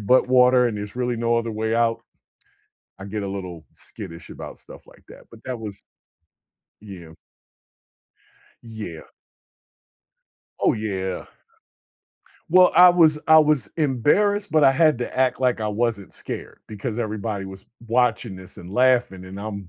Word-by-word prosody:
but 125 Hz, +5 st, +3 dB
water, 125 Hz, -1 st, +5 dB
and 115 Hz, -, -3 dB
there's 105 Hz, +1 st, -7 dB
really 125 Hz, -1 st, -1 dB
no 115 Hz, 0 st, 0 dB
other 115 Hz, 0 st, -2 dB
way 110 Hz, +1 st, -2 dB
out, 115 Hz, -1 st, +1 dB, 1.0 s
I 95 Hz, -, -8 dB
get 105 Hz, 0 st, -5 dB
a -, -, -4 dB
little 90 Hz, -4 st, -7 dB
skittish 85 Hz, +1 st, -11 dB
about -, -, -9 dB
stuff -, -, -14 dB
like -, -, -20 dB
that, -, -, -14 dB
but 115 Hz, -, -15 dB
that 125 Hz, -3 st, -5 dB
was 105 Hz, -3 st, -8 dB, 1.0 s
Yeah. 90 Hz, -6 st, -11 dB, 1.5 s
Yeah. 110 Hz, -8 st, -8 dB, 1.5 s
Oh, -, -, +2 dB
yeah. 95 Hz, -4 st, -4 dB, 1.2 s
Well, 180 Hz, +2 st, +6 dB
I 180 Hz, 0 st, +9 dB
was 160 Hz, -3 st, +4 dB
I 160 Hz, 0 st, +7 dB
was 150 Hz, -8 st, +1 dB
embarrassed, 170 Hz, -, +1 dB
but 155 Hz, -2 st, +4 dB
I 135 Hz, -, +7 dB
had 155 Hz, -1 st, +3 dB
to 125 Hz, -, -5 dB
act 130 Hz, -1 st, +1 dB
like 125 Hz, -3 st, +1 dB
I 105 Hz, -, -1 dB
wasn't 105 Hz, -2 st, -2 dB
scared -, -, -8 dB
because 110 Hz, +2 st, -5 dB
everybody 110 Hz, -2 st, -4 dB
was 95 Hz, 0 st, -11 dB, 0.2 s
watching 115 Hz, -4 st, 0 dB
this, 95 Hz, -1 st, -12 dB
and 90 Hz, +1 st, -11 dB
laughing, 125 Hz, -5 st, +1 dB
and 95 Hz, +2 st, -9 dB
I'm 100 Hz, -3 st, -7 dB
115 Hz, 150 wpm, -22 LUFS, 100-130 Hz, 1.5 s, I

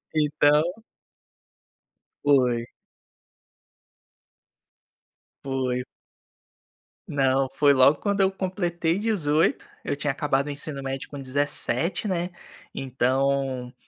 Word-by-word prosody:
Então 150 Hz, 0 st, +3 dB, 1.6 s
Foi. 125 Hz, -5 st, +3 dB, 2.8 s
Foi. 130 Hz, -2 st, -1 dB, 1.3 s
Não, 135 Hz, -1 st, +1 dB
foi 140 Hz, +1 st, +4 dB
logo 140 Hz, +2 st, +5 dB
quando 200 Hz, -1 st, -1 dB
eu 190 Hz, 0 st, +4 dB
completei 180 Hz, -3 st, -2 dB
18. 165 Hz, -8 st, +1 dB, 0.2 s
Eu 145 Hz, -, -2 dB
tinha 145 Hz, 0 st, -1 dB
acabado 140 Hz, -1 st, 0 dB
o -, -, -4 dB
ensino 145 Hz, 0 st, -3 dB
médio 135 Hz, 0 st, -5 dB
com 145 Hz, -, -7 dB
17, 145 Hz, +8 st, 0 dB
né, 180 Hz, -2 st, -1 dB, 0.4 s
então 135 Hz, -1 st, -1 dB
145 Hz, 85 wpm, -25 LUFS, 135-160 Hz, 2.8 s, logo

